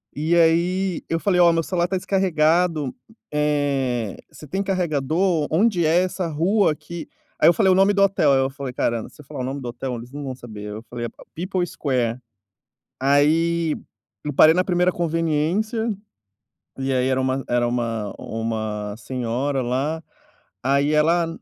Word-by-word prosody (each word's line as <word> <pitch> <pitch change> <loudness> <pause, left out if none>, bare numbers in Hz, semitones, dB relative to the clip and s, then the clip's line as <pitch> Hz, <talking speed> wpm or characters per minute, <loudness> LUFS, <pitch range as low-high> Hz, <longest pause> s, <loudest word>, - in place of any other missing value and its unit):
E 155 +4 +1
aí 175 +2 +2
eu 165 - 0
falei: 180 -1 +2
"Ó, 170 -1 +7
meu 165 0 +1
celular 175 0 0
está 190 +2 -1
descarregado, 170 -5 +1 0.4
eh, 140 -7 0 0.2
você 150 - -12
tem 190 +7 -2
carregador? 170 -3 0
Onde 180 0 +2
é 175 +3 +4
essa 185 -1 -2
rua 175 +6 +2
aqui?" 160 +3 -8 0.3
Aí - - +7
eu 170 - +5
falei 195 -4 +3
o - - +5
nome 195 +2 +4
do 200 0 +3
hotel, 185 -7 +3
aí 135 - +4
eu 135 0 +1
falei: 135 -2 -6
"Caramba, 115 -2 -1
se - - -16
eu - - -18
falar - - -8
o 125 - -2
nome 135 +2 -3
do 125 - -5
hotel 125 +1 -4
eles 120 +2 -9
não 145 +1 -6
vão 130 -2 -5
saber." 110 -4 -9
Eu 105 +2 -7
falei: 120 0 -6
"A - - -9
P - - -17 0.2
People's 185 -3 -1
Square." 125 -4 -1 0.8
Aí 155 +4 +2 0.5
eu 150 - -2
parei 155 +4 +7
na 185 - +2
1ª 180 0 +2
conveniência 170 +8 0 0.9
e 135 0 -1
aí 130 0 +1
era 130 0 +1
uma 130 +1 0
era 120 0 +2
uma 115 -4 -2
uma 110 -2 -3
senhora 130 +2 -2
lá, 140 +7 -1 0.6
aí 140 +3 +2
ela 165 +3 +3
150 Hz, 175 wpm, -22 LUFS, 130-175 Hz, 0.9 s, Ó